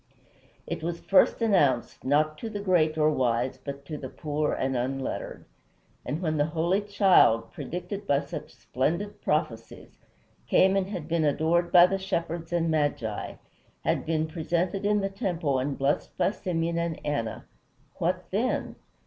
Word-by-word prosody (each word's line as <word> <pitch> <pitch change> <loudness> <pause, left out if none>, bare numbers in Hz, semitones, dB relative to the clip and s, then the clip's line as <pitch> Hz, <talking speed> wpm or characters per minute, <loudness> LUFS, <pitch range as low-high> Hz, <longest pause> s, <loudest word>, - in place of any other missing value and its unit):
It - - -4
was 170 +1 -3
first 200 +3 +3
announced, 145 - +2
not 155 +3 +2
to 225 - -5
the 210 -2 -5
great 175 -6 +2
or 155 0 +4
wise, 125 -2 0
but 140 0 -7
to 150 0 -6
the 130 - -6
poor 150 +1 -2
and 130 0 -1
unlettered. 130 +2 -3 0.6
And 150 +8 -4
when 155 -2 0
the 145 +1 +2
holy 175 +5 +2
child, 195 - +4
predicted 180 +4 -6
by 140 0 +3
such 140 -3 -8
splendid 135 - -2
prophecies, - - -3 0.5
came 190 +1 +4
and 195 -1 0
had 175 -7 -5
been 165 -1 +1
adored 160 +4 +1
by 175 -1 +9
the 195 +1 -1
shepherds 170 -3 -3
and 165 -1 +1
magi, 145 -9 -1 0.5
had - - 0
been 160 -1 +1
presented 175 +4 -1
in 210 0 +2
the 195 - -1
temple 175 - -1
and 135 +2 -2
blessed 140 +1 -1
by - - +2
Simeon 170 -4 -2
and 170 -1 -2
Anna 130 -7 -2 0.5
what - - 0
then? - - -1
160 Hz, 155 wpm, -27 LUFS, 145-180 Hz, 0.6 s, by